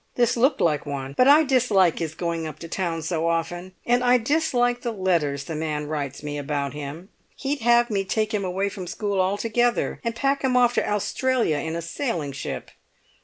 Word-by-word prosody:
This 240 -2 +2
looked 265 +4 +2
like 150 -3 +1
one. 135 -1 -4
But 255 - +4
I 295 +3 +7
dislike 225 - +3
his 160 -2 -3
going 170 -2 -2
up 155 - -8
to 165 - -6
town 165 -2 -2
so 165 0 -1
often, 175 +2 -2
and 245 +1 +2
I 250 0 +5
dislike 245 -2 +1
the 240 - -2
letters 170 -9 0
the 160 - -6
man 150 -1 -2
writes 145 -2 -4
me 145 0 -4
about 140 -1 -2
him. 150 +6 -7 0.3
He'd 280 +1 -2
have 240 0 +3
me 195 -2 +1
take 215 +3 -1
him 205 -2 0
away 190 +2 -1
from 190 -2 -6
school 200 0 -1
altogether, 230 +5 0
and 230 -1 -2
pack 275 +4 0
him 255 -1 +2
off 245 -1 +4
to - - 0
Australia 210 - +1
in 160 +3 -3
a 170 - -3
sailing 170 - -3
ship. 135 - -6
190 Hz, 200 wpm, -24 LUFS, 160-240 Hz, 0.3 s, I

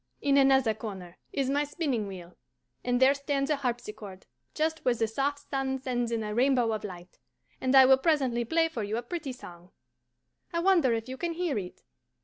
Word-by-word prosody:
In 280 -1 +2
another 270 -4 +4
corner 195 -5 -8
is 275 -2 -1
my 285 +2 +1
spinning 285 - -2
wheel, 180 -2 -10 0.5
and 245 0 +1
there 265 +1 +6
stands 280 0 -1
a 300 - +2
harpsichord, 215 -7 -5 0.3
just 315 0 -1
where 250 - +2
the 225 -1 0
soft 285 +5 -2
sun 270 -1 -1
sends 245 -2 -2
in 230 -1 -1
a 210 0 -4
ribbon 260 +4 +3
of 215 -1 -3
light; 180 -3 -9 0.4
and 260 +1 +2
I 265 -1 +9
will 265 0 +6
presently 265 -6 +1
play 325 +7 +2
for 285 -8 -5
you 210 +2 -2
a 240 - -3
pretty 310 +1 -5
song. 175 -7 -12 0.8
I 335 - -1
wonder 340 -7 +4
if 225 +1 -4
you 260 +1 -6
can 340 +2 -2
hear 340 -4 -1
it? 180 -2 -9
260 Hz, 195 wpm, -28 LUFS, 220-285 Hz, 0.8 s, I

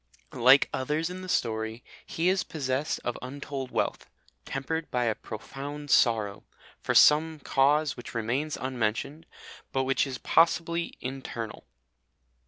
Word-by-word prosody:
Like 130 +4 +6
others 150 +6 -1
in 185 +1 -7
the 185 - -8
story, 110 -4 -1 0.2
he 165 +2 -1
is 190 0 +2
possessed 140 -1 -2
of 120 - -3
untold 135 0 -5
wealth, - - -2 0.4
tempered 155 +4 -3
by 125 -1 0
a 115 -2 +2
profound 140 +7 -7
sorrow, 110 -5 +3 0.4
for - - -1
some 155 +1 +6
cause 145 +2 +2
which 120 - -10
remains 125 +7 -1
unmentioned, 130 +5 -2 0.4
but 135 - +1
which 135 +1 +1
is 130 -2 -5
possibly 170 +2 +2
internal. 125 - -6
135 Hz, 130 wpm, -28 LUFS, 120-155 Hz, 0.4 s, Like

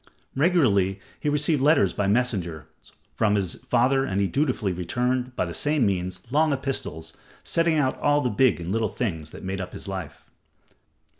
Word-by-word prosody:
Regularly 125 - +2 0.2
he 150 - -1
received 150 0 +1
letters 140 - +4
by 100 - -1
messengers 100 -8 0 0.5
from 105 -2 +2
his 95 -4 -2
father, 130 +3 +3
and 100 -6 -1
dutifully 130 -9 0
he 90 - -7
returned, 125 +6 -1
by - - 0
the 85 - -6
same 145 - +1
means, 90 -2 -2
long 155 +2 +3
epistles, 130 - -3 0.3
setting 165 -1 +1
out 130 -3 0
all 145 0 +3
the 125 -4 0
big 125 +1 +3
and 85 +1 -4
little 110 +1 0
things 80 -10 -3
that - - -11
made 95 0 -3
up 90 - -7
his - - -8
life. 95 -2 -7
115 Hz, 170 wpm, -25 LUFS, 95-140 Hz, 0.5 s, letters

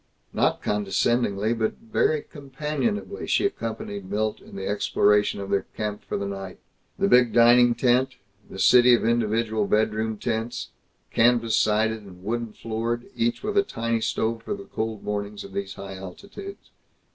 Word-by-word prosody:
Not - - +1
condescendingly 105 +1 +1
but 110 -1 -1
very 210 -9 0
companionably 150 - -4
she - - +2
accompanied 105 - -4
Milt 105 +1 -1
in - - -13
the 95 0 -5
exploration 105 0 +2
of 100 0 -6
their 100 - 0
camp 105 -1 -3
for - - -3
the 100 - -3
night 95 -1 -6 0.4
the - - +2
big 125 -2 +5
dining 120 +1 +6
tent, 125 +1 +2 0.3
the - - -9
city 125 +5 +7
of 115 - -2
individual 110 -2 +1
bedroom 110 +1 +1
tents, 115 +1 -3 0.4
canvas 115 -1 +3
sided 110 +1 +2
and 95 -3 -14
wooden 115 +2 -2
floored, 115 +2 -3
each 115 +1 0
with 210 -1 -2
a - - +6
tiny 115 - -2
stove 115 0 -1
for 205 - -4
the 200 0 -10
cold 110 - -4
mornings 105 0 -4
of 100 - -11
these 100 0 -4
high 95 -1 -8
altitudes. 200 - -10
110 Hz, 160 wpm, -25 LUFS, 105-120 Hz, 0.4 s, city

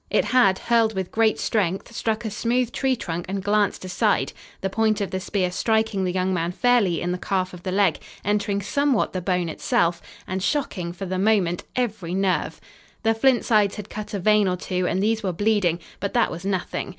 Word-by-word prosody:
It - - +2
had, 200 -7 +4
hurled 225 -1 +2
with 190 -2 -3
great 220 -1 +2
strength, 195 +1 -1
struck 225 0 -1
a 220 - -2
smooth 240 +3 0
tree 265 -1 +1
trunk 175 -6 -5
and 195 0 -3
glanced 205 -2 +1
aside, 185 - +1 0.3
the - - 0
point 220 0 +1
of 200 - -2
the 190 - -2
spear 185 -1 -1
striking 220 0 +1
the 180 - 0
young 185 +1 0
man 170 0 -1
fairly 220 -8 +2
in 175 - -1
the 180 - -3
calf 185 -1 -1
of 180 - -10
the 185 - -3
leg, 190 -4 +2 0.3
entering 205 0 0
somewhat 280 +3 +1
the 185 - -2
bone 180 -1 0
itself, 170 +1 0 0.2
and 190 +1 -3
shocking, 195 - -1
for 185 +3 -6
the 185 0 -2
moment, 190 -4 +2
every 210 -8 -2
nerve. 190 -1 0 0.4
The 225 0 +3
flint 245 +2 +2
sides 210 -3 +3
had 210 -1 -8
cut 210 0 -5
a - - -2
vein 210 +1 +4
or 180 0 0
two 180 0 -2
and 190 +2 0
these 220 +1 +1
were 190 -4 -2
bleeding, 200 -3 +1 0.2
but 200 +3 -3
that 235 - +3
was 170 +3 -7
nothing. 190 -1 -2
200 Hz, 210 wpm, -24 LUFS, 185-220 Hz, 0.4 s, had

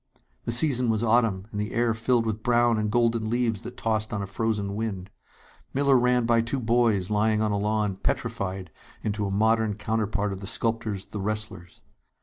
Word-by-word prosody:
The - - -1
season 125 -1 +3
was 110 0 +1
autumn, 115 -5 +2
and 105 - -3
the 105 - -4
air 120 -1 +2
filled 115 +1 +1
with 110 -1 -2
brown 120 -1 +3
and 105 0 0
golden 115 -1 +1
leaves 115 -3 0
that 125 - -9
tossed 110 -1 -1
on 100 -1 -2
a - - -3
frozen 100 0 -2
wind. 100 -3 -4 0.6
Miller 140 0 +4
ran 125 -1 +3
by 115 0 +3
two 115 +4 -2
boys 115 -5 +1
lying 110 +1 +2
on 110 -1 +1
a 100 - 0
lawn, 105 -1 0
petrified 95 -2 -3 0.3
into 105 -1 -1
a - - -2
modern 110 +1 +2
counterpart 105 -1 -1
of 95 - -8
the 95 - -6
sculptor's 110 -3 -1
"The 105 - -6
Wrestlers." 105 -4 -5
110 Hz, 185 wpm, -26 LUFS, 105-115 Hz, 0.6 s, Miller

